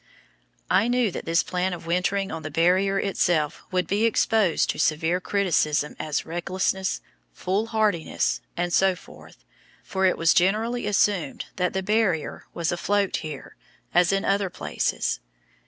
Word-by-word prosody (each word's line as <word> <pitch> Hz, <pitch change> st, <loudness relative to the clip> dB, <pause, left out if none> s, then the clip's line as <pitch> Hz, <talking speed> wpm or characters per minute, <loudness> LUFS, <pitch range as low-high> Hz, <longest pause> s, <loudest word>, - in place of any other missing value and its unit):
I 220 Hz, -, +3 dB
knew 245 Hz, -4 st, +2 dB
that -, -, -6 dB
this 165 Hz, +1 st, +2 dB
plan 180 Hz, +1 st, -1 dB
of 170 Hz, -2 st, -8 dB
wintering 185 Hz, +3 st, 0 dB
on 160 Hz, -, -5 dB
the 155 Hz, -, -5 dB
Barrier 185 Hz, +5 st, +2 dB
itself 175 Hz, -6 st, 0 dB
would 185 Hz, -1 st, 0 dB
be 205 Hz, +3 st, +1 dB
exposed 220 Hz, -5 st, +2 dB
to -, -, -8 dB
severe 165 Hz, +3 st, +1 dB
criticism 155 Hz, -7 st, +1 dB
as 150 Hz, -2 st, -2 dB
recklessness, 190 Hz, +3 st, -1 dB, 0.3 s
foolhardiness, 205 Hz, -, 0 dB, 0.2 s
and 175 Hz, 0 st, -1 dB
so 190 Hz, -1 st, +4 dB
forth, 180 Hz, -, -16 dB, 0.4 s
for 190 Hz, -1 st, +1 dB
it 185 Hz, -, +1 dB
was 165 Hz, 0 st, +4 dB
generally 215 Hz, +6 st, +1 dB
assumed 200 Hz, -7 st, +1 dB
that 180 Hz, -1 st, 0 dB
the 190 Hz, 0 st, -1 dB
Barrier 205 Hz, -6 st, 0 dB
was 170 Hz, -1 st, -2 dB
afloat 200 Hz, +3 st, 0 dB
here, 155 Hz, -3 st, -8 dB, 0.4 s
as 175 Hz, 0 st, +4 dB
in 195 Hz, 0 st, 0 dB
other 195 Hz, -1 st, +1 dB
places. -, -, -2 dB
185 Hz, 145 wpm, -25 LUFS, 170-200 Hz, 0.4 s, so